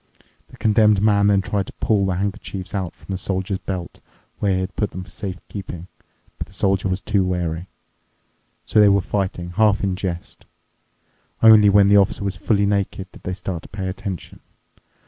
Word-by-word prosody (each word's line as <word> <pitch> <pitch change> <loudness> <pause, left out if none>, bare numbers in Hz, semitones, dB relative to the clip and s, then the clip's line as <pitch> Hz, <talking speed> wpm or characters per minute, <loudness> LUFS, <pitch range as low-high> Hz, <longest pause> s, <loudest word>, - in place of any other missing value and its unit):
The - - -16
Condemned 105 -2 +4
Man 100 -1 +3
then 100 -1 +4
tried 100 -1 -2
to - - -10
pull 100 -3 +1
the 95 - 0
handkerchiefs 95 -1 -4
out 95 -4 -3
from - - -12
the 95 - -3
Soldier's 95 0 -2
belt, 90 -3 -6 0.4
where 100 -2 +1
he - - 0
had 95 0 -5
put 105 - -1
them 95 - -7
for 90 - -13
safe 95 -1 -5
keeping, 90 -4 -7 0.5
but - - -5
the 95 - -17
Soldier 95 -1 +1
was 95 +1 -2
too 100 -3 +1
wary. 90 -1 -2 1.0
So - - +2
they 105 -1 +7
were 100 0 +4
fighting, 90 -3 -3
half 105 +2 +2
in 95 -2 0
jest. 90 -3 -6 1.0
Only 110 -2 +8
when 100 0 +5
the 100 +1 +6
Officer 100 0 +2
was 100 -2 -2
fully 100 +2 +1
naked 100 -2 -1
did - - -15
they 95 - -4
start 90 -2 -5
to - - -14
pay 95 -2 -5
attention. 95 0 -6
95 Hz, 190 wpm, -21 LUFS, 95-100 Hz, 1.0 s, Only